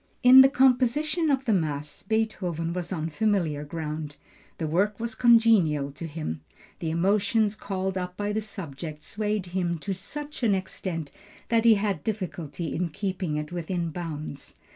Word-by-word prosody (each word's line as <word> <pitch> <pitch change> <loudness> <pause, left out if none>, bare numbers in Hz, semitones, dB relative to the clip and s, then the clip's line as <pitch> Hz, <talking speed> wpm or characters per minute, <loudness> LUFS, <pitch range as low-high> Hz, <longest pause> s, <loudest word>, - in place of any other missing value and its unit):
In 255 +1 +10
the 265 - +7
composition 275 +4 +3
of 270 -1 +1
the 225 - +3
mass, 150 -5 -2
Beethoven 185 -6 -1
was 180 0 -4
on 160 -2 -2
familiar 175 -6 0
ground; 150 -1 -5 0.4
the 165 - -2
work 195 +7 +1
was 230 0 -3
congenial 220 - +4
to 155 +4 -7
him. 145 - -5 0.4
The 165 - -2
emotions 205 +5 +2
called 190 -2 -3
up 180 0 -5
by 205 0 -1
the 220 - 0
subject 160 -7 -7
swayed 210 -2 -2
him 175 -1 -1
to 195 +5 -3
such 295 - -7
an 215 -5 +3
extent 180 -5 -4 0.4
that 230 0 +3
he 230 -1 +8
had 200 -6 -1
difficulty 175 -6 -4
in 175 +1 -1
keeping 185 -3 -3
it 150 +1 -4
within 175 -1 -2
bounds. 155 -4 -6
185 Hz, 160 wpm, -27 LUFS, 160-220 Hz, 0.4 s, In